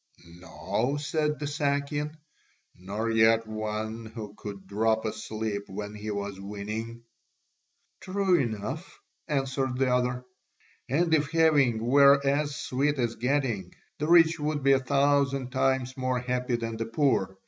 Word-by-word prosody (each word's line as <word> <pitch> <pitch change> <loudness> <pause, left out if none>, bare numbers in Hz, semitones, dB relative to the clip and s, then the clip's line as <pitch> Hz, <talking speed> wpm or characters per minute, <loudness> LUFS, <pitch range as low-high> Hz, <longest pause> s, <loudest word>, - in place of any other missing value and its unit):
"No," 100 - -2
said 150 0 -1
the 150 - -4
Sakian, 145 +1 -1 0.6
"nor 105 +5 -3
yet 115 0 +4
one 110 +1 -4
who 110 -2 -8
could 100 -3 -8
drop 110 +3 0
asleep 110 -1 -4
when 105 +2 -6
he 105 0 -6
was 100 -1 -4
winning." 110 +4 -6 1.0
"True 190 -1 +1
enough," 130 - -4 0.3
answered 135 -3 -1
the 130 -1 +2
other, 125 0 0 0.6
"and 160 +5 +2
if 150 -2 +2
having 145 -9 +3
were 140 +2 +6
as 145 +1 +1
sweet 140 +4 -1
as 120 -3 0
getting, 120 -8 -1 0.2
the 150 - -1
rich 165 -1 +5
would 150 -1 -2
be 135 - +5
a 135 - +5
thousand 140 -1 +1
times 130 -1 0
more 130 -1 -1
happy 125 0 -1
than 115 -1 -4
the 115 0 -3
poor. 115 -7 +1
125 Hz, 135 wpm, -28 LUFS, 110-145 Hz, 1.0 s, were